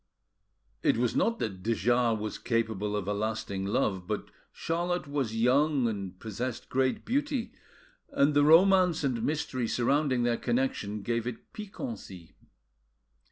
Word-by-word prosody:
It - - +2
was 120 -1 0
not 230 0 +2
that 95 -4 -4
de 115 +4 0
Jars 120 +1 +2
was 110 0 -4
capable 110 -3 -1
of 100 -2 -3
a 105 - 0
lasting 105 -2 -3
love, 100 -5 0
but - - -3 0.2
Charlotte 175 0 -2
was 135 -6 -2
young 130 +3 +3
and 100 -4 -5
possessed 120 +3 -5
great 130 0 0
beauty, 275 -1 -1 0.6
and 145 +2 +3
the 145 0 +4
romance 180 +1 +5
and 125 -5 0
mystery 130 -3 -1
surrounding 130 +1 +1
their 120 -1 +1
connection 120 -5 -1
gave 115 +1 -1
it 120 -2 -7
piquancy. 210 - -8
120 Hz, 140 wpm, -29 LUFS, 110-150 Hz, 0.6 s, romance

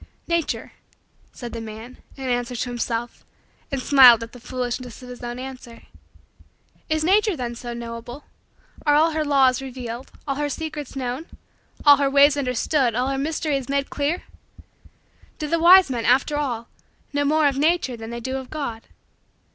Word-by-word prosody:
"Nature," 335 -1 -1 0.6
said 240 -2 -8
the 230 - -5
man, 225 +3 -9 0.2
in 270 - -7
answer 245 0 -1
to 245 +1 -3
himself, 240 -1 -3 0.5
and 275 - -1
smiled 250 -5 +8
at 230 - -9
the 245 - -12
foolishness 250 0 -5
of 250 - -10
his 250 - -9
own 240 0 -5
answer. 255 -2 -9 1.1
Is 315 0 +1
nature 405 +3 +3
then 240 -2 -3
so 240 0 -7
knowable? 235 +3 -7 0.6
Are 295 -1 +4
all 320 +2 +4
her 310 0 -1
laws 270 -3 +3
revealed; 250 -2 -7 0.2
all 275 -1 -1
her 295 0 -1
secrets 305 -2 -5
known; 260 +4 -4 0.6
all 290 -1 +9
her 280 -1 +1
ways 280 +1 +5
understood; 255 -2 0
all 250 +2 0
her 270 - -1
mysteries 290 -2 -2
made 280 0 -1
clear? 295 +5 -1 1.1
Do 305 - -4
the 335 +2 +1
wise 355 -2 +7
men, 235 -2 -2
after 260 +4 +3
all, 245 -6 -2 0.5
know 285 0 +1
more 305 +2 +2
of 275 -1 0
nature 315 -4 +1
than 225 -1 -8
they 235 0 -5
do 260 +3 -3
of 265 -1 -8
God? 255 -7 -5
265 Hz, 170 wpm, -23 LUFS, 240-295 Hz, 1.1 s, all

